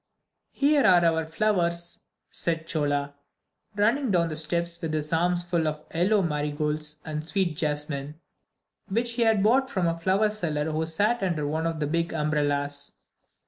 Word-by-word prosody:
"Here 285 Hz, 0 st, +3 dB
are 175 Hz, -2 st, +5 dB
our 160 Hz, -1 st, +1 dB
flowers," 170 Hz, -2 st, -1 dB, 0.3 s
said 165 Hz, -1 st, -2 dB
Chola, 145 Hz, -4 st, -1 dB, 0.6 s
running 230 Hz, +6 st, +2 dB
down 170 Hz, -4 st, +2 dB
the 155 Hz, -, -4 dB
steps 170 Hz, +2 st, -1 dB
with 160 Hz, -1 st, -2 dB
his 155 Hz, +1 st, -2 dB
arms 175 Hz, +1 st, +2 dB
full 170 Hz, -2 st, 0 dB
of 150 Hz, 0 st, -3 dB
yellow 190 Hz, +5 st, +2 dB
marigolds 150 Hz, 0 st, -2 dB
and 155 Hz, -1 st, -4 dB
sweet 175 Hz, -1 st, -1 dB
jasmine, 150 Hz, -1 st, -3 dB, 0.7 s
which 235 Hz, +4 st, 0 dB
he 240 Hz, -, -2 dB
had 220 Hz, -3 st, +3 dB
bought 260 Hz, +5 st, +3 dB
from 185 Hz, -9 st, -1 dB
the 165 Hz, -, +2 dB
flower 190 Hz, +5 st, +1 dB
seller 160 Hz, -7 st, -2 dB
who 160 Hz, +1 st, -1 dB
sat 205 Hz, +8 st, +1 dB
under 170 Hz, -6 st, -1 dB
one 160 Hz, +3 st, -1 dB
of 165 Hz, -1 st, -3 dB
the 150 Hz, -, 0 dB
big 170 Hz, +3 st, -1 dB
umbrellas. 145 Hz, -2 st, -1 dB
165 Hz, 160 wpm, -26 LUFS, 150-185 Hz, 0.7 s, are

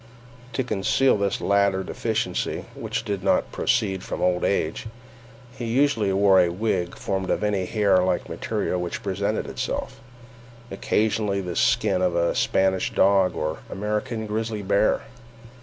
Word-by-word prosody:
To 130 Hz, -, 0 dB
conceal 120 Hz, +4 st, +2 dB
this 100 Hz, -1 st, -1 dB
latter 100 Hz, -1 st, +2 dB
deficiency, -, -, -2 dB
which 115 Hz, +1 st, -4 dB
did 100 Hz, -4 st, -3 dB
not 95 Hz, -, +1 dB
proceed 105 Hz, -6 st, 0 dB
from -, -, -5 dB
old 90 Hz, -1 st, +1 dB
age, 90 Hz, +1 st, -1 dB, 0.7 s
he 120 Hz, -, -5 dB
usually 115 Hz, -4 st, +2 dB
wore 95 Hz, -1 st, +5 dB
a 90 Hz, -, +2 dB
wig 90 Hz, -1 st, -2 dB
formed 95 Hz, -1 st, -3 dB
of -, -, 0 dB
any 100 Hz, -3 st, 0 dB
hair 100 Hz, -3 st, +3 dB
like 90 Hz, -1 st, 0 dB
material 90 Hz, -, -2 dB
which 90 Hz, -, -5 dB
presented 100 Hz, +2 st, -1 dB
itself—occasionally 120 Hz, -4 st, -3 dB
the 90 Hz, -2 st, -5 dB
skin 90 Hz, -, +2 dB
of 90 Hz, -2 st, +1 dB
a 85 Hz, 0 st, +2 dB
Spanish 95 Hz, -1 st, +1 dB
dog 95 Hz, -2 st, +3 dB
or 80 Hz, +1 st, -3 dB
American 105 Hz, +2 st, -3 dB
grizzly 110 Hz, 0 st, -3 dB
bear. 100 Hz, +2 st, +2 dB
100 Hz, 140 wpm, -24 LUFS, 95-110 Hz, 0.7 s, wore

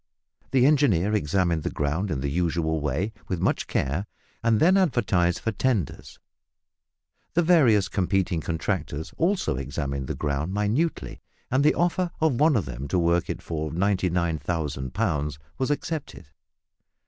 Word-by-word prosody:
The 130 Hz, -1 st, +4 dB
engineer 120 Hz, -, +3 dB
examined 85 Hz, -3 st, +1 dB
the -, -, -2 dB
ground 75 Hz, +8 st, -1 dB
in 70 Hz, -6 st, -2 dB
the 70 Hz, 0 st, -2 dB
usual 80 Hz, -1 st, 0 dB
way, 75 Hz, +10 st, -1 dB
with 90 Hz, -, -2 dB
much -, -, 0 dB
care, 75 Hz, +10 st, -1 dB, 0.4 s
and 115 Hz, -2 st, +3 dB
then 180 Hz, +4 st, +5 dB
advertised 100 Hz, -, +2 dB
for 115 Hz, -, -2 dB
"tenders." 110 Hz, -, -2 dB, 1.2 s
The 175 Hz, -, +4 dB
various 130 Hz, -, +4 dB
competing 95 Hz, -3 st, 0 dB
contractors 80 Hz, -2 st, -3 dB
also 175 Hz, -, +1 dB
examined 70 Hz, 0 st, -3 dB
the -, -, -3 dB
ground 75 Hz, +6 st, -2 dB
minutely, 110 Hz, +11 st, -1 dB, 0.3 s
and 130 Hz, +2 st, +3 dB
the 150 Hz, -, +4 dB
offer 175 Hz, +1 st, +1 dB
of 155 Hz, -7 st, +2 dB
one 150 Hz, -1 st, +4 dB
of 100 Hz, -9 st, +1 dB
them 65 Hz, +1 st, -6 dB
to 90 Hz, -, 0 dB
work 85 Hz, 0 st, +2 dB
it -, -, -4 dB
for 80 Hz, -2 st, -3 dB
99,000 85 Hz, -7 st, -1 dB
pounds 75 Hz, -9 st, -1 dB, 0.2 s
was 130 Hz, -, 0 dB
accepted. 145 Hz, -, -4 dB
90 Hz, 145 wpm, -25 LUFS, 75-120 Hz, 1.2 s, then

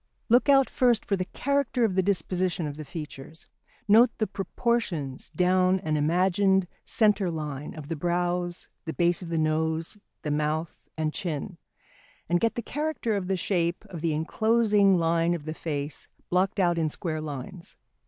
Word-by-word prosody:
Look 245 Hz, +5 st, +4 dB
out 270 Hz, -1 st, +6 dB
first 245 Hz, -3 st, +2 dB
for 200 Hz, -, +1 dB
the 185 Hz, -1 st, -2 dB
character 280 Hz, +1 st, 0 dB
of 205 Hz, -, 0 dB
the 190 Hz, -, +3 dB
disposition 180 Hz, -2 st, 0 dB
of 145 Hz, -1 st, -4 dB
the 155 Hz, -, -6 dB
features, 155 Hz, 0 st, -9 dB, 0.4 s
note 225 Hz, +4 st, +7 dB
the 215 Hz, -, +1 dB
proportions 195 Hz, -, -2 dB
down 185 Hz, +3 st, +2 dB
an 155 Hz, -4 st, -1 dB
imagined 185 Hz, +5 st, +3 dB, 0.2 s
centre 210 Hz, -4 st, +2 dB
line, 150 Hz, -3 st, -5 dB
of 150 Hz, -3 st, -8 dB
the 165 Hz, -, -3 dB
brows, 175 Hz, +2 st, -1 dB, 0.2 s
the 160 Hz, -, -3 dB
base 175 Hz, +1 st, +2 dB
of 175 Hz, -, -7 dB
the 165 Hz, -, -1 dB
nose, 160 Hz, +4 st, 0 dB, 0.2 s
the 150 Hz, -, -2 dB
mouth 155 Hz, +2 st, -1 dB, 0.2 s
and 155 Hz, -1 st, -1 dB
chin, 165 Hz, -8 st, -4 dB, 0.7 s
and 175 Hz, +1 st, +2 dB
get 230 Hz, +3 st, +1 dB
the 235 Hz, -, -3 dB
character 295 Hz, -6 st, -2 dB
of 190 Hz, -3 st, -2 dB
the 190 Hz, 0 st, 0 dB
shape 175 Hz, +1 st, -1 dB
of 170 Hz, -4 st, -6 dB
the 160 Hz, -2 st, 0 dB
enclosing 210 Hz, +3 st, +3 dB
line 165 Hz, +1 st, +2 dB
of 150 Hz, -4 st, -7 dB
the 155 Hz, -, -3 dB
face 150 Hz, -2 st, -5 dB, 0.2 s
blocked 185 Hz, +3 st, +1 dB
out 175 Hz, -2 st, +2 dB
in 160 Hz, -1 st, +1 dB
square 155 Hz, 0 st, -4 dB
lines. 150 Hz, +3 st, -8 dB
175 Hz, 170 wpm, -27 LUFS, 155-200 Hz, 0.7 s, note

